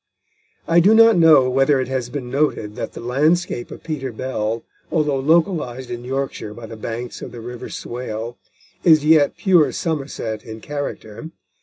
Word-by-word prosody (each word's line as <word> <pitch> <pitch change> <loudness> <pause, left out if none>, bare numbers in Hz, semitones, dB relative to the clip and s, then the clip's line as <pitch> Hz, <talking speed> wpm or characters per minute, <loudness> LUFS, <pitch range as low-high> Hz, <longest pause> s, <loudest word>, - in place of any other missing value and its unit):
I 170 +1 +5
do 200 +6 +5
not 225 -1 +7
know 160 -6 +6
whether 135 +2 +3
it 130 - -1
has 130 -2 -3
been 125 -2 -6
noted 135 -7 0
that - - -5
the - - -8
landscape 140 +2 0
of - - -10
Peter 140 -5 -4
Bell, 115 -2 -3 0.3
although 150 -4 +1
localised 150 -5 +1
in 120 0 -5
Yorkshire 130 -5 -4
by 120 - -9
the 115 - -9
banks 115 +2 -6
of - - -7
the 120 - -9
River 120 +1 -8
Swale, 120 -1 -5 0.5
is 155 -3 +5
yet 155 -2 +4
pure 180 -6 +4
Somerset 135 -9 -3
in 110 -2 -9
character. 145 0 -6
130 Hz, 165 wpm, -21 LUFS, 120-155 Hz, 0.5 s, not